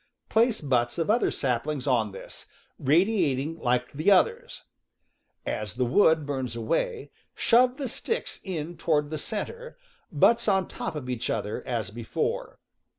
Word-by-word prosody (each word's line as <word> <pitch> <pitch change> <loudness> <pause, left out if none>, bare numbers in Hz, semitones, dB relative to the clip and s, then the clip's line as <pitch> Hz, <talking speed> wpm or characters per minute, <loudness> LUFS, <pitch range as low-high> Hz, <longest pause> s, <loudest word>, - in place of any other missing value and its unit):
Place 225 0 +3
butts 125 -4 0
of 165 +4 +1
other 235 - +3
saplings 130 +2 -2
on 115 -6 +1
this, 95 - -10 0.3
radiating 160 -2 +2
like 125 0 0
the 155 +7 +1
others. 465 - +2 0.8
As 105 -1 -3
the 125 0 +1
wood 160 +3 +4
burns 130 -4 -3
away, 435 - -2 0.2
shove 250 +2 +4
the 280 -3 -3
sticks 455 - -3
in 175 -3 -5
toward 150 -2 +1
the 155 - -3
center, 470 - -5 0.3
butts 235 0 +4
on 190 -2 +2
top - - -5
of 140 -4 -5
each 125 -2 -3
other, 105 - -2
as 115 -6 -2
before. 115 0 -3
150 Hz, 145 wpm, -27 LUFS, -, 0.8 s, wood